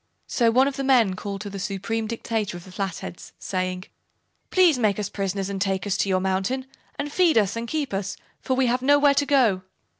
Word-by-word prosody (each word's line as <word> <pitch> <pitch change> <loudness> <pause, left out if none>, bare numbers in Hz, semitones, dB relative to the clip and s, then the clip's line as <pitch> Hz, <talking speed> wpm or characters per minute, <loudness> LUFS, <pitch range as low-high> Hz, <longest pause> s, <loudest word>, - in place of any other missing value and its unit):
So 235 -2 +2
one 255 +4 +4
of 280 - -3
the 275 - -2
men 245 -8 +4
called 200 0 -5
to 205 - -5
the 200 - -6
Supreme 210 +3 -2
Dictator 225 -4 -3
of 175 - -11
the 185 - -13
Flatheads, 185 -3 -5
saying: 185 -1 -3 0.7
"Please 350 -8 +4
make 210 -4 +2
us 205 -2 -2
prisoners 195 -1 -2
and 195 -1 -4
take 195 -1 0
us 205 - 0
to 200 - 0
your 185 -1 +2
mountain, 190 +8 -1 0.3
and 290 0 -3
feed 340 -4 +3
and 225 +3 +1
keep 295 -4 -2
us, 195 0 -3 0.2
for 260 - -1
we 260 0 +2
have 250 +1 +1
nowhere 285 +1 +5
to 285 +1 +2
go." 240 -10 +3
210 Hz, 210 wpm, -24 LUFS, 195-260 Hz, 0.7 s, nowhere